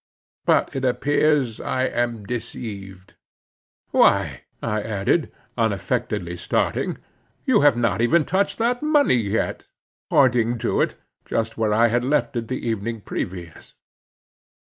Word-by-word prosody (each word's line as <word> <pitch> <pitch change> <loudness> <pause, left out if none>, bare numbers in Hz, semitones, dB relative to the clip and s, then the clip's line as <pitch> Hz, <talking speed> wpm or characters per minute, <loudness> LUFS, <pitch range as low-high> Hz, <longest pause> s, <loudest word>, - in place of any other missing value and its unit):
But - - +2
it 135 - -2
appears 140 -1 +1
I 130 - -1
am 120 -4 -1
deceived. 100 -5 -7 0.7
Why," - - +3
I 110 -2 -1
added, 110 - 0 0.3
unaffectedly 95 -4 -1
starting, - - -1 0.5
"you - - +4
have 145 -4 +5
not 115 -3 +1
even 155 +6 +3
touched 190 +3 0
that 240 +2 0
money 300 - +3
yet," 110 -1 -2 0.4
pointing 120 -3 +3
to - - 0
it, - - 0 0.3
just 115 0 -2
where 110 -1 0
I 115 +2 +4
had 120 +2 +1
left 145 +1 0
it 115 -1 -2
the 130 -1 -4
evening 115 0 -2
previous. 90 -4 -6
115 Hz, 125 wpm, -23 LUFS, 105-135 Hz, 0.7 s, have